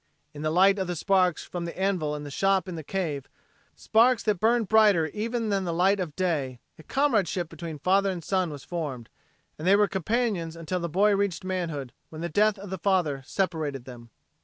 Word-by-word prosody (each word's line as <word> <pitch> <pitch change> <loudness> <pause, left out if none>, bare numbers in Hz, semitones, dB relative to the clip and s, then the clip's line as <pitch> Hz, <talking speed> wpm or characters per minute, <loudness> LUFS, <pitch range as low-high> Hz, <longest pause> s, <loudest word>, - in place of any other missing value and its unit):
In 145 - -8
the 155 - 0
light 195 +5 +4
of 190 - -1
the 175 - -2
sparks 185 -1 +2
from 175 -1 -5
the 170 - -7
anvil 180 -6 0
in 150 - -6
the 145 - -7
shop 195 +3 +1
in 185 - -5
the 165 - -5
cave, 150 -5 -3 0.5
sparks 235 +2 +3
that 210 -4 0
burned 225 +1 +2
brighter 210 -6 +5
even 225 +4 -2
than 195 -2 0
the 175 - -2
light 190 +4 +2
of 165 -5 -4
day, 145 -9 -1 0.2
a - - -9
comradeship 200 - 0
between 165 -1 -7
father 195 +6 +2
and 180 -3 -4
son 185 0 0
was 145 -3 -8
formed, 145 -9 -5 0.5
and 160 - -3
they 195 - +7
were 205 0 +4
companions 195 -3 -1
until 165 +2 -3
the 170 -1 -3
boy 200 +5 +3
reached 200 -3 -1
manhood 165 -9 -3 0.2
when 155 0 -8
the 170 - -3
death 210 +5 +2
of 195 -1 -9
the 190 - -4
father 170 -8 +1
separated 155 -9 -2
them. 120 -2 -11
180 Hz, 210 wpm, -26 LUFS, 155-200 Hz, 0.5 s, they